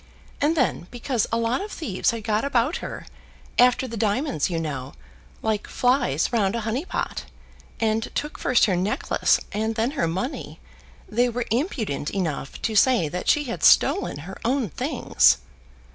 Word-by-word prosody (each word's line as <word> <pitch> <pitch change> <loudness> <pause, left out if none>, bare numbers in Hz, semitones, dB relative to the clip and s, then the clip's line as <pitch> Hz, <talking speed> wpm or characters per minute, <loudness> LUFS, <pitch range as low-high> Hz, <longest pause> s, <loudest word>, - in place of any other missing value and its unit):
And 310 +3 +2
then, 245 - 0
because 245 -2 -1
a 230 - +1
lot 230 +6 0
of 415 +1 -6
thieves 210 - -1
had 230 -2 -3
got 215 0 0
about 280 +3 +1
her, - - -7 0.5
after 250 +1 +5
the 230 - -6
diamonds, 220 - 0
you 170 -2 -1
know, 140 -4 -5 0.5
like 220 -2 -1
flies 245 - +1
round 205 -3 +2
a 230 - -1
honey 230 +8 -2
pot, - - -3 0.5
and 220 0 +1
took 295 - -3
first 255 - +4
her 190 - +1
necklace 210 - +1
and 220 +2 -1
then 230 +3 0
her 280 - 0
money, 190 - -4 0.5
they 245 +3 +2
were 240 0 -2
impudent 225 - -1
enough 160 -8 -3
to 220 - -1
say 225 - +4
that 180 +3 -3
she 295 - +4
had 240 -4 -5
stolen 390 - +4
her 190 +1 -9
own 245 -2 0
things!" - - +3
230 Hz, 165 wpm, -24 LUFS, 195-255 Hz, 0.5 s, after